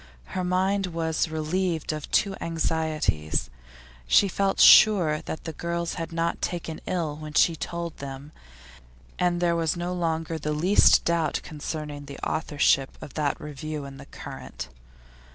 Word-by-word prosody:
Her 185 - -1
mind 190 +2 +1
was 165 -1 -1
relieved 160 +1 -1
of 155 -1 -6
two 200 -2 +2
anxieties; 160 - -1 0.6
she 200 - +5
felt 195 +1 0
sure 175 -8 +7
that 160 - -5
the 160 - -5
girls 170 +1 -3
had 165 -1 -5
not 165 0 -1
taken 165 -2 -4
ill 160 -5 -2
what 155 0 -5
she 165 - +5
told 170 +1 -5
them, 140 +1 -8 0.9
and 175 -1 +2
there 170 -1 +2
was 165 0 0
no 175 +1 -2
longer 165 -2 -2
the 150 0 -2
least 180 +7 +5
doubt 170 -2 +1
concerning 150 -1 -6
the 140 - -9
authorship 145 -3 +1
of - - -10
that 150 -2 -1
review 150 0 -6
in 135 0 -9
The 140 +1 -12
Current. - - -8
160 Hz, 150 wpm, -26 LUFS, 150-175 Hz, 0.9 s, sure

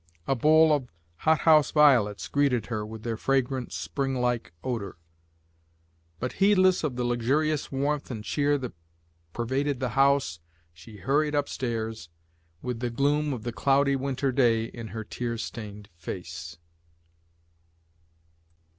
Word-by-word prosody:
A - - +1
bowl 155 +4 +5
of 135 -4 -1 0.3
hothouse 155 - +4
violets 125 -9 +4
greeted 135 -6 +1
her 105 -1 -2
with 110 0 -8
their 115 -2 -2
fragrant 130 0 0
springlike 125 -5 -2
odour; 115 -8 -4 1.2
but 130 - -3
heedless 185 -3 +4
of 145 -5 -1
the 125 - -2
luxurious 135 +6 0
warmth 140 +2 -1
and 110 -5 -5
cheer 145 +5 +1
that 125 -3 -6 0.6
pervaded 130 +5 -1
the 130 -1 -1
house, 135 -9 +2 0.3
she 90 +6 -13
hurried 145 +9 +1
up 145 -1 +1
stairs, 110 - -4 0.5
with 125 -2 -3
the 120 0 -1
gloom 145 +5 +1
of 120 -5 -4
the 120 0 -4
cloudy 140 +5 +3
winter 135 0 -1
day 120 -4 +3
in 115 0 -8
her 110 0 -6
tear 115 +2 -4
stained 105 -2 -7
face. 85 -1 -7
125 Hz, 130 wpm, -27 LUFS, 115-140 Hz, 1.2 s, bowl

